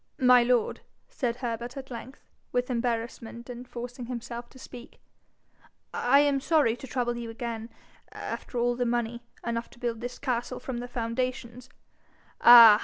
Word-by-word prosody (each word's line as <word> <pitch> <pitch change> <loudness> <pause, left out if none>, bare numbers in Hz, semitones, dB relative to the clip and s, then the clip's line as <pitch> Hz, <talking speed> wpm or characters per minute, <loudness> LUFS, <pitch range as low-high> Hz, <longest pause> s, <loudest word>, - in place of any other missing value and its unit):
'My 250 -1 +7
lord,' 240 -1 +1 0.3
said 255 - -1
Herbert 240 0 -4
at 265 -1 -8
length, 250 +3 -8 0.3
with 250 +1 0
embarrassment, 235 0 -3
and 245 +1 -8
forcing 245 0 -7
himself 240 -1 -6
to - - -16
speak, 250 -1 -11 0.9
'I 270 +3 +4
am 285 -1 +3
sorry 295 -7 +3
to 265 - -9
trouble 240 -2 -1
you 235 -1 -5
again, 225 0 -5 0.4
after 245 - -6
all 240 0 +2
the 245 - 0
money, 235 0 -1 0.2
enough 235 0 -2
to 240 - -18
build 235 -2 -2
this 245 +1 -5
castle 250 -2 -2
from 250 -3 -4
the 245 - -5
foundations 245 +1 -3 0.4
' - - -31
'Ah! 230 -3 +11
240 Hz, 160 wpm, -28 LUFS, 235-250 Hz, 0.9 s, Ah